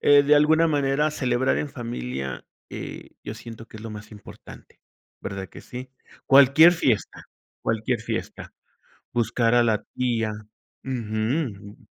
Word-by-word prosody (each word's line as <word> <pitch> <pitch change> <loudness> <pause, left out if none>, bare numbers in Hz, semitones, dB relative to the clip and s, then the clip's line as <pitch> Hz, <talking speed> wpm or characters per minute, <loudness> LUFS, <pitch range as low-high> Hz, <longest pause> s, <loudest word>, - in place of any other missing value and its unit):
eh, 145 0 +6
de 145 +1 +5
alguna 155 +3 +5
manera 145 0 +1
celebrar 130 -2 +1
en 150 - -2
familia, 65 - -5 0.2
eh, - - -8
yo 105 - -5
siento 115 0 -10
que 110 - -12
es - - -11
lo 115 - -6
más 105 0 -9
importante, 105 -2 -14 0.4
¿verdad 95 -1 -6
que - - -12
sí? 125 +1 -8 0.4
Cualquier 140 +5 +7
fiesta, 130 - 0 0.4
cualquier 115 +1 -1
fiesta, - - -5 0.6
buscar 115 0 +1
a 120 - +5
la 110 -3 +1
tía 115 -3 0 0.5
Ujú. 110 -2 -3
120 Hz, 135 wpm, -24 LUFS, 110-140 Hz, 0.6 s, Cualquier